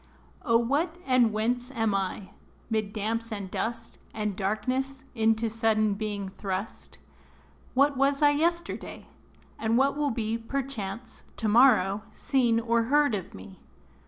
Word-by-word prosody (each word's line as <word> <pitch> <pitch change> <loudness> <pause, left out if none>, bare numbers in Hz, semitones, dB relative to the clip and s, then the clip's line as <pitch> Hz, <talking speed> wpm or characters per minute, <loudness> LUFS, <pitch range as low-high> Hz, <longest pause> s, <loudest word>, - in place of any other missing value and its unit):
O 230 -1 +3
what, 285 +8 0
and 255 -4 +4
whence 240 +4 -1
am 225 -5 0
I, 195 0 -3 0.4
'mid 215 -2 0
damps 225 +2 -2
and 200 -3 -5
dust, 230 0 -4 0.2
And 210 -2 -2
darkness, 255 +7 -2
into 225 -1 +2
sudden 220 -1 +1
being 205 -1 -4
thrust? 190 +1 -6 0.8
What 280 +1 +3
was 275 +2 +2
I 290 - +7
yesterday? 340 +3 -2 0.5
and 225 +1 +1
what 275 +2 +3
will 295 -1 0
be, 225 -2 -2
Perchance, 230 -3 -5 0.2
to 220 - -1
morrow, 215 -4 +5
seen 245 -5 +1
or 230 0 +1
heard 290 0 +3
of 190 -4 -4
me? 95 0 -12
230 Hz, 135 wpm, -27 LUFS, 215-265 Hz, 0.8 s, I